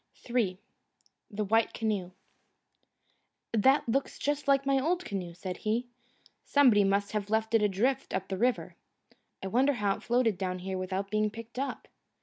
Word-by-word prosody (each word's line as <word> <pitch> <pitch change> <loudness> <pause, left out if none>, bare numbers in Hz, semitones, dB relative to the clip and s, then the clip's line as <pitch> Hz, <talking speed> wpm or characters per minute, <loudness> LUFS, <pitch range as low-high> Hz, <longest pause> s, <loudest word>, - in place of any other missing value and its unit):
III 230 -7 0 0.7
The 210 -1 -3
White 225 +3 +2
Canoe 210 -5 -1 1.4
"That 265 +6 +4
looks 270 +4 -1
just 290 0 -2
like 275 0 +3
my 275 0 +3
old 350 +6 0
canoe," 180 -4 -5
said 180 +1 -5
he. 225 +3 -1 0.6
"Somebody 250 -8 +5
must 200 +1 +1
have 210 -1 -3
left 220 +1 0
it 225 - +5
adrift 225 +7 +1
up 190 0 -2
the 190 - -3
river. 245 +2 0 0.7
I - - -2
wonder 265 +7 +3
how 205 -5 0
it - - -14
floated 235 -5 +1
down 185 -1 -2
here 190 +1 -4
without 190 +2 -3
being 215 0 +2
picked 230 +3 -9
up." 275 - -4
220 Hz, 160 wpm, -30 LUFS, 195-255 Hz, 1.4 s, Somebody